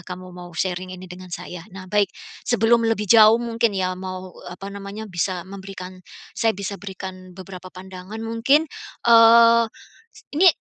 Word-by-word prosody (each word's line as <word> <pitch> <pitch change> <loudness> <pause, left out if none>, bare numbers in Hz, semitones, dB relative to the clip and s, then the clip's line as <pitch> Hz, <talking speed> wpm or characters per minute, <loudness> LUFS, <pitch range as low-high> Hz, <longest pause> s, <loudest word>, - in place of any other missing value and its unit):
kamu 185 0 -8
mau 175 -1 -10
sharing 185 0 -2
ini 185 - -10
dengan 180 0 -11
saya. 180 0 -7
Nah 190 -1 -9
baik 205 +1 +1 0.4
sebelum 230 0 +3
lebih 210 -2 -1
jauh 220 +1 +7
mungkin 235 -1 0
ya, 185 -1 0
mau, 185 0 -7 0.2
eee 175 - -7
apa 195 - -8
namanya, 200 +2 -7
bisa 180 -1 -2
memberikan 190 -1 -9 0.3
saya 225 - +2
bisa 200 0 -4
berikan 190 -1 -8
beberapa 185 -1 -9
pandangan 185 +3 -9
mungkin, 245 +8 +2 0.4
eee, 230 0 +7 0.7
ini 365 +4 +6
195 Hz, 155 wpm, -22 LUFS, 185-225 Hz, 0.7 s, jauh